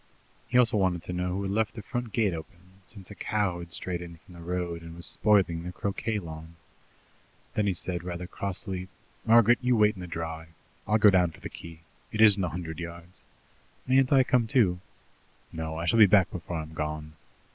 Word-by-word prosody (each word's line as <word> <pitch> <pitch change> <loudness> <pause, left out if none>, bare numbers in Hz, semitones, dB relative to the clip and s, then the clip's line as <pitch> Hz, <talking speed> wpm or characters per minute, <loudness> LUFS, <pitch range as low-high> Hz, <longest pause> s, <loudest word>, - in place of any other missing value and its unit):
He 125 - +1
also 115 -3 +4
wanted 90 -3 +1
to 90 - -5
know 90 0 -1
who 100 +2 -2
had 95 - -2
left 110 +1 0
the 110 - -7
front 120 0 -4
gate 105 -5 +1
open, 80 +2 -8 0.3
since 100 -3 -8
a - - -6
cow 100 -4 -1
had 85 0 -9
strayed 90 +2 -2
in 85 -1 -9
from 90 - -18
the 85 - -11
road, 85 -1 -3
and 85 0 -10
was 85 - -6
spoiling 95 -6 +2
the 90 +1 -6
croquet 100 +3 -2
lawn. 80 -3 -8 1.0
Then 105 -1 +1
he 95 - +1
said 85 0 -2
rather 90 0 -5
crossly: 95 0 -4 0.4
"Margaret, 115 +1 +6
you 125 -1 +2
wait 105 0 +4
in 95 - -10
the 90 - -6
dry. 80 -1 -5 0.4
I'll 105 +1 +3
go 105 -1 +7
down 90 -2 +4
for 80 - -15
the - - -7
key. 85 -1 -11 0.3
It 110 - -5
isn't 105 -3 +6
a 90 - 0
hundred 80 0 -6
yards. 85 +1 -9 0.6
"Mayn't 130 0 +3
I 135 -2 +6
come 125 -3 +2
too?" 110 -9 +3 0.7
"No; 80 0 -4
I 85 - -3
shall 115 +6 +3
be 105 - +9
back 95 -2 +4
before 90 -1 -5
I'm 80 0 -6
gone." 75 0 -4
90 Hz, 210 wpm, -28 LUFS, 85-105 Hz, 1.0 s, be